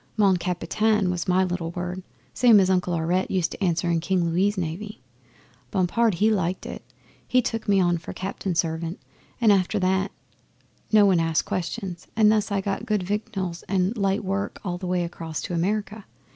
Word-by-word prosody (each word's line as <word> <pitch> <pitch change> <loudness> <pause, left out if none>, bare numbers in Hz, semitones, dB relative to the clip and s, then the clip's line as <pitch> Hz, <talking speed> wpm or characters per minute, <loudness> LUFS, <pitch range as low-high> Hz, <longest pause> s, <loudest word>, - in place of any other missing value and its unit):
"Mon 200 -3 +4
Capitaine" 185 +3 0
was 175 -2 -3
my 185 +1 +3
little 175 -2 -2
word, 180 +2 -4 0.3
same 235 -4 +6
as 190 -1 +3
Uncle 180 -1 +1
Aurette 170 +3 0
used 180 -3 0
to - - -5
answer 175 -2 +1
in 170 -1 +2
King 180 +1 0
Louis' 195 +4 +1
Navy. 185 +5 -4 0.7
Bompard, 195 - +1
he 215 +6 +3
liked 185 -3 -1
it. - - -7 0.4
He 255 - +3
took 225 -3 -2
me 200 -1 +4
on 175 -2 +2
for 160 - -8
cabin 190 -1 -4
servant, 165 +1 -1 0.4
and 225 -3 +5
after 195 +1 +2
that 190 +1 +1 0.8
no 215 -2 +6
one 190 -3 +4
asked 165 -1 +1
questions; 185 0 -4
and 215 -1 +5
thus 215 -1 +1
I 200 -1 +1
got 195 0 -3
good 210 -3 +1
victuals 195 -3 -3
and 190 +3 +1
light 195 -1 0
work 195 +2 -2
all 180 -3 -3
the 185 - -5
way 180 -1 +1
across 165 -2 -5
to - - -4
America. 205 +4 -1
185 Hz, 185 wpm, -25 LUFS, 175-205 Hz, 0.8 s, same